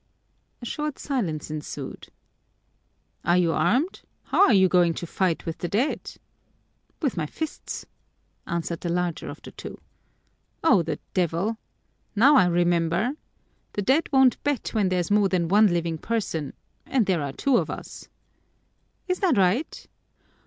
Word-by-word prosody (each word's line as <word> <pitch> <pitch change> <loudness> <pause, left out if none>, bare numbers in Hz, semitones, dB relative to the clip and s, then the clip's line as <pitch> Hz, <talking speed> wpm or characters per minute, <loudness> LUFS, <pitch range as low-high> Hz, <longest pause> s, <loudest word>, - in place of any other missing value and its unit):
A - - -5
short 300 +3 -3
silence 175 - -3
ensued. 155 -1 -6 1.2
"Are 175 +1 +3
you 175 -2 +3
armed? 245 - +1 0.2
How 400 - +4
are - - +4
you 190 -2 +6
going 175 -2 +3
to - - -5
fight 175 0 -1
with 165 0 -5
the 175 - -2
dead?" 230 - -1 0.9
"With 275 - +1
my 155 -3 -1
fists," 315 - -6 0.6
answered 170 -1 -3
the 175 - -3
larger 175 -1 -2
of - - -10
the - - -9
two. - - -9 0.8
"Oh, 235 - +5
the 160 -2 -3 0.2
devil! 185 +5 0 0.6
Now 270 +8 +6
I 185 -8 +6
remember 175 +4 +2 0.6
the 205 - -2
dead 275 +10 +2
won't 265 -2 +4
bet 290 -3 -1
when 210 -4 +2
there's 180 0 -1
more 205 -1 +4
than 175 -3 0
one 210 +3 +6
living 170 -3 -1
person, 165 -11 -2 0.3
and 250 -5 +2
there 185 -5 +1
are 140 -1 -3
two 265 - +2
of - - -1
us." - - -8 1.0
"Is 365 0 -1
that 355 - +2
right? 195 - +1
185 Hz, 150 wpm, -25 LUFS, 170-245 Hz, 1.2 s, you